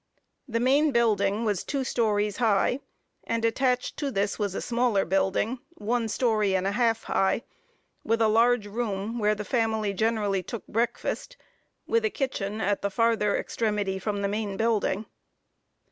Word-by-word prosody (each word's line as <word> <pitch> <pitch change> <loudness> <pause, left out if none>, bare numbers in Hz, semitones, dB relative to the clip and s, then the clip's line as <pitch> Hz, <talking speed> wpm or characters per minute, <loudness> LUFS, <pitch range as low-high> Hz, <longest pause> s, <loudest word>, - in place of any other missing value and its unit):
The 230 -2 -1
main 280 +5 +3
building 215 -3 +2
was 205 -4 0
two 275 -2 -2
stories 210 -5 0
high, 225 +2 +2 0.4
and 230 0 -1
attached 250 +2 0
to 285 - -1
this 205 -4 -1
was 200 -2 -1
a - - -1
smaller 235 -4 +1
building, 195 +6 0 0.2
one 230 +2 -1
story 215 -4 +1
and 185 0 0
a 195 - +1
half 225 0 +1
high, 195 +4 +1 0.6
with 225 +1 +1
a 225 - +4
large 230 +1 +3
room, 210 +1 -3
where 210 0 +2
the 210 0 -5
family 220 -4 0
generally 205 -2 0
took 220 +5 -7
breakfast, 240 - -2 0.5
with 460 0 +1
a 435 - +2
kitchen 220 - -3
at 205 -1 0
the 200 - 0
farther 225 -1 +2
extremity 205 -4 -1
from 205 +1 -2
the - - +2
main 205 -1 -3
building. 220 -2 0
220 Hz, 160 wpm, -27 LUFS, 205-235 Hz, 0.6 s, a